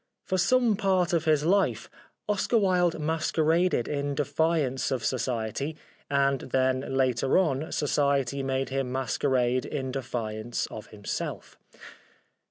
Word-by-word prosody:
For 185 - 0
some 235 +3 +3
part 190 -3 +1
of 165 -2 +1
his 155 -2 +3
life 195 +3 +2 0.4
Oscar 210 +3 +1
Wilde 180 -5 +2
masqueraded 160 -1 +1
in 145 -1 -2
defiance 145 -2 0
of 130 -4 -2
Society, 130 +4 -2 0.3
and 140 -1 +2
then 130 0 +1 0.2
later 130 0 +2
on 155 -4 0
Society 140 -2 +1
made 135 0 -1
him 135 -1 -2
masquerade 130 -1 0
in 135 -3 -4
defiance 120 -3 -3
of 110 - -8
himself. 105 -2 -5
140 Hz, 120 wpm, -27 LUFS, 130-165 Hz, 0.4 s, some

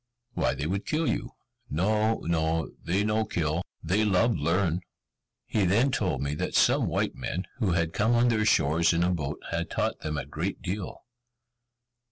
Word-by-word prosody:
"Why, - - 0
they 70 - -3
would 95 +5 -2
kill 155 +1 0
you!" - - -2 0.4
"No, 110 +7 +1
no, 80 -1 0
they 95 +4 +1
no 110 +1 +1
kill; 80 -4 -1 0.2
they 95 +7 +2
love 105 +3 +3
learn." 90 0 +1 0.6
He 105 - 0
then 115 +9 +3
told 100 - 0
me 70 +1 -1
that - - -3
some - - +4
white - - 0
men, 90 +3 -4
who 100 -7 +1
had 85 -1 0
come 110 +3 +2
on 120 +1 +4
their 110 -2 +2
shores 85 -5 +3
in 85 +1 +2
a 90 - +2
boat, 75 -6 -3
had 85 0 -2
taught - - -1
them 75 -1 -3
a - - -3
great 80 +7 -3
deal. 95 +1 -4
90 Hz, 180 wpm, -27 LUFS, 80-105 Hz, 0.6 s, some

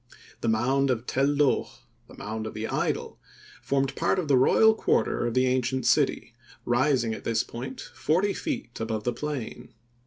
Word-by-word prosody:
The - - -3
mound 130 +5 +2
of 120 -2 -1
Tel 135 +2 +1
Loh, 145 -1 +2 0.4
"The - - -14
Mound 110 +1 -5
of 110 - -8
the 110 +1 -3
Idol," - - -2 0.4
formed 135 -1 0
part 170 +3 +1
of 180 -4 -1
the 140 - +4
royal 220 +12 +5
quarter 120 - 0
of 120 - -3
the 130 0 +3
ancient 130 0 0
city, 135 -5 +1 0.3
rising 120 -2 +2
at - - -8
this 115 -1 0
point 130 +3 -7
forty 185 +6 0
feet 120 - -5
above 110 -1 -3
the 120 - -1
plain. 135 -5 -6
130 Hz, 175 wpm, -26 LUFS, 115-140 Hz, 0.4 s, royal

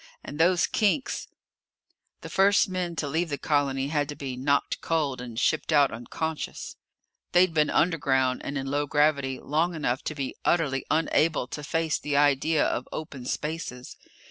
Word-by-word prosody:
And 145 - -8
those 175 +1 +4
kinks 220 +6 0 0.9
The - - -8
first 195 +1 +4
men 180 -2 -3
to 150 - -2
leave 165 +4 -1
the 145 - -2
colony 140 -2 0
had 145 -1 0
to 145 - -5
be 135 -3 -5
knocked 140 +2 0
cold 145 -6 -1
and 120 -2 -6
shipped 155 +3 +1
out 145 -3 +5
unconscious. 150 +7 -5 0.6
They'd 180 -1 +5
been 150 -2 +2
underground 135 -6 +1
and 145 - -4
in 135 - -3
low 145 +2 -1
gravity 140 -3 +1
long 165 +4 0
enough 130 -5 -1
to 155 - -3
be 135 -2 -3
utterly 150 -6 +1
unable 160 -2 +2
to 150 - -6
face 160 +1 0
the 145 -1 -1
idea 145 +2 +3
of 125 - -2
open 140 -5 -6
spaces. 150 -6 -4
150 Hz, 165 wpm, -26 LUFS, 135-165 Hz, 0.9 s, out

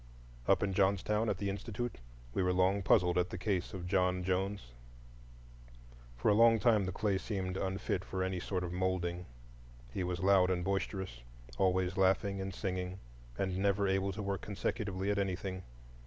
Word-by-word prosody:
Up - - +4
in 100 -1 0
Johnstown, 100 +3 +2
at 100 - 0
the 100 - -2
Institute, 110 - -4 0.3
we - - 0
were 90 0 +2
long 95 +2 +3
puzzled 90 -2 +4
at 90 - 0
the - - -5
case 95 -2 -1
of 90 -2 -6
John 90 -1 +1
Jones. 95 -5 -1 1.5
For 60 - +2
a - - +6
long 115 +1 +6
time 110 -3 +3
the - - -1
clay 100 0 0
seemed 95 -2 -3
unfit 95 -1 -2
for 95 0 -3
any 95 -1 -1
sort 90 +1 -2
of 90 0 -4
moulding. 90 -1 -1 0.7
He 95 - -1
was 90 0 -2
loud 95 -1 +5
and 90 -1 0
boisterous, 95 - -2 0.4
always 95 0 +2
laughing 95 +1 +2
and 95 0 -3
singing, 90 -1 -3 0.4
and 95 -1 -1
never 100 0 +2
able 95 +1 +1
to 105 +2 -5
work 100 -2 -2
consecutively 100 -1 -2
at 100 - 0
anything. 95 -1 -2
95 Hz, 170 wpm, -33 LUFS, 90-100 Hz, 1.5 s, a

